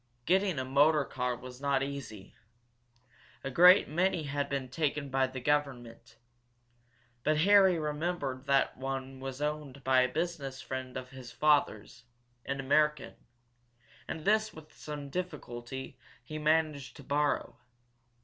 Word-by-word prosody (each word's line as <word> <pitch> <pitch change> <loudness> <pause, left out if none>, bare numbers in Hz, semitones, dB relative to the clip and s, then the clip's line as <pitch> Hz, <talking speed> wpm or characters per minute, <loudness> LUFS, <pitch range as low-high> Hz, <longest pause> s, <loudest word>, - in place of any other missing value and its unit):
Getting 190 -2 +2
a 130 - -2
motor 145 +2 +4
car 125 -1 -2
was 125 +1 -11
not 140 -1 +1
easy. 130 -8 -7 1.1
A 135 - -4
great 180 +7 +7
many 175 +2 0
had 145 0 -2
been 135 -2 -2
taken 145 +1 -2
by 135 0 +2
the 130 0 -7
government. 125 -4 -2 1.1
But 155 0 +2
Harry 195 -1 +6
remembered 150 -3 -3
that 135 -1 +2
one 135 0 -5
was 135 +1 -5
owned 150 -3 -4
by 130 -1 +4
a 125 - +3
business 155 -5 -3
friend 130 -1 -5
of 125 -1 -8
his 130 -2 -10
father's, 125 -6 +1 0.4
an 140 0 -2
American, 150 +2 +1 0.9
and 155 - -6
this, 215 +1 +2
with 155 -1 -13
some 145 -2 -7
difficulty, 130 -7 -6 0.2
he 155 +5 -6
managed 155 -2 0
to 145 - -12
borrow. 145 +2 -1
140 Hz, 135 wpm, -31 LUFS, 130-155 Hz, 1.1 s, great